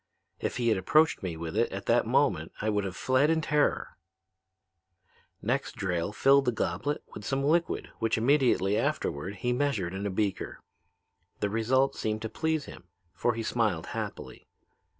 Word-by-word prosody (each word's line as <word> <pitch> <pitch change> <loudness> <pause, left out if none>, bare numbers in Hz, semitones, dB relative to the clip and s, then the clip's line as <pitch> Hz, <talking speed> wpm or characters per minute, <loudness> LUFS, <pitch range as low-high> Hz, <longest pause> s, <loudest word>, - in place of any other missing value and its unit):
If - - -2
he 120 -2 +1
had 110 -4 +2
approached 155 - +3
me 85 -4 -4
with 80 0 -5
it - - +2
at - - -5
that - - +3
moment - - +1
I 110 - 0
would 105 -1 0
have 95 -1 -5
fled 130 +3 +2
in 165 0 +3
terror. 150 -1 0 1.5
"Next, - - -1
Drayle 90 0 -1
filled 135 +5 +4
the 125 - +3
goblet 105 +6 -2
with 105 - -8
some 135 +4 -1
liquid 165 +4 +1
which 115 0 +1
immediately 120 -5 +3
afterward 105 - -2
he 125 +5 -1
measured 125 -10 0
in 100 +2 -3
a - - -1
beaker. 100 +1 -2 0.8
The 105 - -1
result 130 +5 +2
seemed 110 0 -2
to 110 - -3
please 160 +2 -1
him, 90 - -11 0.3
for 120 +6 0
he 115 - -3
smiled 110 -9 0
happily. - - -6
115 Hz, 170 wpm, -29 LUFS, 100-140 Hz, 1.5 s, filled